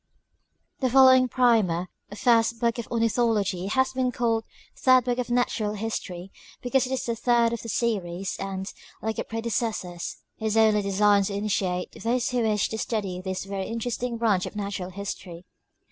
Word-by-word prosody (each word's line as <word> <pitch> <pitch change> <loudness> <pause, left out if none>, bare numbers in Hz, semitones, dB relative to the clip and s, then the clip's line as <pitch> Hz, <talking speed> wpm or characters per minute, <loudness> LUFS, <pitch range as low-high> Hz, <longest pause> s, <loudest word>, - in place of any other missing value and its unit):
The 260 - +1
following 260 0 +7
Primer, 220 -9 +2 0.2
or - - -7
First 230 -1 +3
Book 235 +1 0
of 235 - -5
Ornithology, 225 -5 +1
has 260 +5 +1
been 255 -1 0
called 225 -2 0 0.3
Third 255 -1 +5
Book 245 0 0
of 250 - -2
Natural 240 -3 0
History, 195 -4 -5 0.3
because 255 +1 +1
it - - -7
is 265 - -1
the 235 - -1
third 235 0 +2
of 235 - -4
the 230 - -7
series, 195 -6 -1
and, 195 -1 -4 0.4
like 220 0 -2
its - - -4
predecessors, 225 -6 -3 0.2
is 220 0 0
only 215 -1 +5
designed 200 0 +3
to 200 - -4
initiate 190 -3 -1
those 240 +2 -1
who 250 -1 +1
wish 215 -2 +1
to 220 - -4
'study 195 -6 -2
this 190 0 -4
Tery 195 -1 -4
interesting 235 +1 -3
braneb 215 -6 +1
of - - -9
Natural 200 -3 -4
History. 185 -2 -7
220 Hz, 170 wpm, -26 LUFS, 195-240 Hz, 0.4 s, following